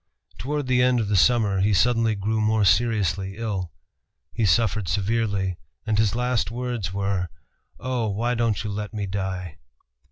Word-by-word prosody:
Toward 145 +5 -2
the 125 -1 +2
end 125 -1 +3
of 105 -3 -1
the 105 - +1
summer 105 -1 +3
he 100 +1 +2
suddenly 115 +3 +2
grew 110 +2 -1
more 110 -1 +2
seriously 95 -1 +1
ill. 100 -7 -3 0.6
He 115 -3 +1
suffered 100 +1 +2
severely, 100 0 -1 0.3
and 110 -1 0
his 110 0 +2
last 125 -2 0
words 120 -5 -3
were, 100 -2 -1 0.5
"Oh! 125 -3 -1
why 115 +5 -1
don't 115 -3 0
you 105 - -3
let 105 +2 -5
me 105 -1 -2
die?" 95 -4 -4
105 Hz, 160 wpm, -24 LUFS, 95-115 Hz, 0.6 s, end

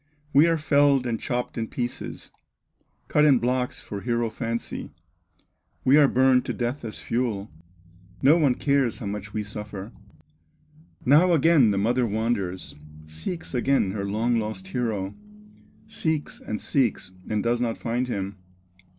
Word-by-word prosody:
We 145 +4 +6
are 165 -1 +2
felled 140 -3 +3
and 115 -2 -1
chopped 125 -1 -3
in 115 - -2
pieces, 120 +1 -5 0.8
Cut 150 - +3
in 145 -4 +6
blocks 125 +1 -1
for 100 -1 -6
hero 120 -1 -1
fancy, 115 +1 -4 1.0
We 130 - +6
are 145 -2 +7
burned 130 -1 +4
to - - -2
death 120 +3 -3
as 110 -2 -5
fuel, 115 -4 -2 0.7
No 140 +4 +7
one 140 -6 +3
cares 140 -4 +1
how 120 - -7
much 100 0 -5
we 105 0 -2
suffer." 105 0 -7 1.1
Now 160 +7 +5
again 160 -6 +5
the 100 - 0
mother 120 +4 +2
wanders, 100 -8 -2 0.3
Seeks 80 - -6
again 125 -5 +2
her 100 0 -3
long 115 +3 +1
lost 105 -4 -5
hero, 105 -4 -2 0.7
Seeks, 160 -9 -2
and 110 - -4
seeks, 120 -8 0 0.2
and 105 -1 0
does 120 +1 +1
not 115 -2 -1
find 120 +2 -2
him. 100 -4 -4
120 Hz, 145 wpm, -25 LUFS, 105-135 Hz, 1.1 s, are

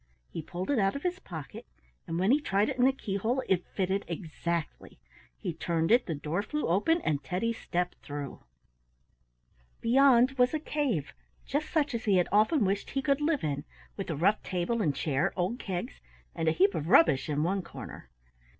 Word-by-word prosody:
He - - -4
pulled 180 - -4
it 275 - +2
out 195 -1 +2
of 280 - -5
his 360 +1 -1
pocket, 160 - -9 0.4
and 165 - -2
when 190 +5 +3
he 290 +3 +4
tried 205 -6 +1
it - - -3
in 250 - +5
the 265 - +6
keyhole 230 +1 -2
it 180 -2 +1
fitted 195 +1 -1
exactly. 170 - -4 0.4
He 170 - -4
turned 165 +1 -1
it, 240 +1 +4
the 165 - -2
door 150 +6 -2
flew 300 +8 -3
open, 325 - +2
and 150 - -1
Teddy 185 +10 -1
stepped 180 -5 -3
through. 145 -2 -6 1.4
Beyond 255 +1 +5
was 250 +4 +4
a - - 0
cave, 275 - -2 0.3
just 290 +3 -2
such 300 -4 +1
as 235 +1 -3
he 200 -3 +4
had 180 - +3
often 215 - +4
wished 195 +1 -1
he 270 - -2
could 280 0 +2
live 300 -1 +1
in, 145 -2 -2 0.3
with 195 - -5
a 160 - -1
rough 195 +8 +2
table 185 +5 -1
and 150 -8 +1
chair, 155 +5 0
old 190 +7 -1
kegs, 175 - -5 0.3
and 165 - -2
a - - +5
heap 190 +5 +3
of 160 -3 -3
rubbish 145 -7 +5
in 150 0 0
one 190 +3 0
corner. 170 - -10
195 Hz, 195 wpm, -29 LUFS, 165-245 Hz, 1.4 s, the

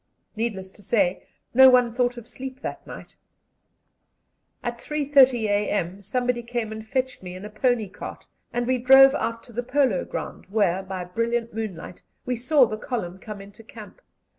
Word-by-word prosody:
Needless 210 -4 -3
to 205 - -17
say, 195 -3 0 0.3
no 265 +2 +9
one 250 -2 +4
thought 245 0 0
of 235 -1 -10
sleep 265 0 -8
that - - -6
night. - - -10 1.5
At 240 0 -4
3.30 275 -4 +3
a.m. 205 -2 -1
someone 245 +4 -1
came 235 -2 -4
and 220 0 -6
fetched 260 +4 -2
me 180 -1 -8
in 185 +3 -8
a 210 - -8
pony 230 0 +1
cart, 190 - -9 0.3
and 240 0 -1
we 255 +1 +1
drove 270 +2 +8
out 230 -5 -2
to 240 - -14
the 240 - -2
polo 250 -6 +1
ground, - - -7
where, 195 -3 +1
by 190 -1 -5
brilliant 230 +5 -2
moonlight, 200 -6 -6 0.2
we 250 - -1
saw 255 +3 +4
the 215 -2 -4
column 190 -8 -4
come 210 -1 -8
into 200 +3 -14
camp. 225 - -13
230 Hz, 170 wpm, -24 LUFS, 205-250 Hz, 1.5 s, no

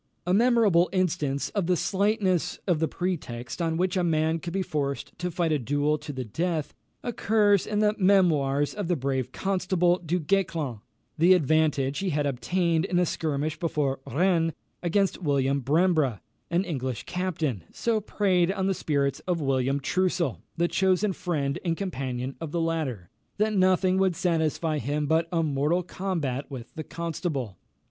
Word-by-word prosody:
A 180 - +1
memorable 215 -6 +4
instance 150 -7 0
of 200 -5 -1
the 180 -1 +2
slightness 195 -1 +1
of 175 -5 +1
the 160 - +1
pretext 155 -8 -4
on 165 -1 0
which 180 +1 0
a 185 - +1
man 160 -1 +1
could 170 +2 -6
be 190 +1 -1
forced 140 -6 -3
to 180 0 -2
fight 170 -1 0
a 150 - +2
duel 145 +4 0
to 150 0 -7
the 130 -2 -5
death, 160 - -2 0.3
occurs 210 -4 +2
in 210 0 0
the 210 0 +3
Memoirs 155 -8 +3
of 205 -4 -4
the 175 - +2
brave 130 -3 -2
Constable, 185 -1 +1
Du 175 +1 -1
Guesclin. 165 - -1 0.4
The 180 +3 +7
advantage 150 -4 +1
he 195 -1 -1
had 145 -2 0
obtained, 160 +6 0
in 185 -2 0
a 180 - +4
skirmish 155 -2 -2
before 150 -6 -1
Rennes, 165 +2 +2 0.3
against 190 +2 +1
William 140 -3 +1
Brembre, 150 - +2 0.3
an 170 +3 +1
English 130 - -3
captain, 160 - -2
so 225 -2 0
preyed 190 -4 +1
on 195 -1 -1
the 195 - +2
spirits 140 -6 0
of 175 -2 +1
William 135 -1 +1
Troussel, 175 -2 0 0.2
the 170 +1 +2
chosen 190 +2 +2
friend 150 -4 -2
and 165 -2 0
companion 130 -8 -3
of 165 - -4
the 170 - -1
latter, 155 - -2 0.3
that 215 +1 +1
nothing 185 -1 +3
would 190 -2 +2
satisfy 160 -3 0
him 145 +4 -1
but 160 +3 +2
a 165 -2 +1
mortal 150 +4 +1
combat 165 -8 -3
with 130 -4 -8
the 160 -3 -5
Constable. 160 - -4
165 Hz, 165 wpm, -27 LUFS, 145-185 Hz, 0.4 s, The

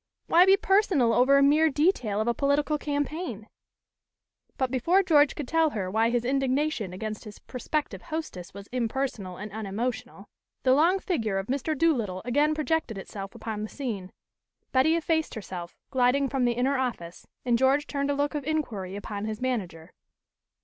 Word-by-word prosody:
"Why 355 +3 +5
be 390 +1 +7
personal 385 - +3
over 260 +4 +5
a 280 - +5
mere 305 +3 +5
detail 270 - +1
of 220 - -2
a 235 - +3
political 290 +3 +1
campaign?" 290 - -3 1.1
But 260 -2 0
before 335 +10 +3
George 300 -5 +4
could 290 - -5
tell 325 +1 +3
her 195 -8 -4
why 225 +3 +2
his 240 0 0
indignation 270 - 0
against 215 +3 -5
his 210 -1 -10
prospective 290 +4 -4
hostess 310 - -6
was 200 0 -10
impersonal 235 -6 -2
and 210 +1 -7
unemotional, 220 +4 -4 0.4
the 255 - +5
long 335 +7 +4
figure 230 - -1
of 195 - -2
Mr. 280 +5 -2
Doolittle 235 - +1
again 295 +5 +2
projected 310 -7 -1
itself 195 +2 -8
upon 220 -2 -5
the 215 - -4
scene. 215 -10 -5 0.6
Betty 270 +5 +4
effaced 320 -2 0
herself, 180 -5 -7 0.2
gliding 260 +2 +2
from 260 -1 0
the 240 - +2
inner 260 +3 +1
office, 180 -10 -4 0.2
and 240 -1 +3
George 265 +4 +3
turned 280 -1 -2
a 285 - +1
look 290 +1 0
of 295 -2 -3
inquiry 230 -11 -3
upon 205 0 -5
his 215 0 -4
manager. 185 -10 -3
255 Hz, 170 wpm, -27 LUFS, 215-300 Hz, 1.1 s, be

